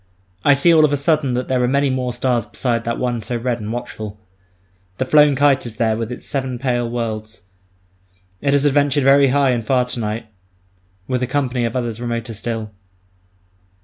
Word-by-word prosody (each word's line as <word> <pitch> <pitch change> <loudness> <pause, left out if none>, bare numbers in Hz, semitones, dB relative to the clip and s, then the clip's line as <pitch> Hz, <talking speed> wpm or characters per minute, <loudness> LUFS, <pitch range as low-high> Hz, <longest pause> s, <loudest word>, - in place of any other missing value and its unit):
I 145 - +5
see 170 +5 +4
all 155 -1 +6
of 150 - +4
a 145 - +1
sudden 140 -3 +1
that 125 0 -2
there 130 -1 +1
are 125 - +2
many 140 +1 +1
more 130 -1 -1
stars 120 -2 -1
beside 115 -2 -2
that 115 0 -2
one 120 -2 -2
so 120 +3 -3
red 120 0 -2
and 105 0 -5
watchful. 110 -3 -6 0.8
The 130 - -1
flown 150 +1 +5
kite 140 -2 +2
is 115 - -9
there 110 0 +1
with 115 +1 -4
its 125 - -7
seven 130 -3 -2
pale 120 -2 -1
worlds; 110 -3 -4 1.0
it 140 - +1
has 140 0 +3
adventured 145 -1 +2
very 140 +1 +6
high 135 0 +3
and 120 -2 -1
far 125 +2 +2
to 125 0 -5
night 110 +1 -3 0.8
with 130 -1 -1
a 125 - 0
company 130 -4 -1
of 115 - -3
others 120 -2 -3
remoter 115 -1 -3
still. 110 0 -4
125 Hz, 195 wpm, -19 LUFS, 115-140 Hz, 1.0 s, all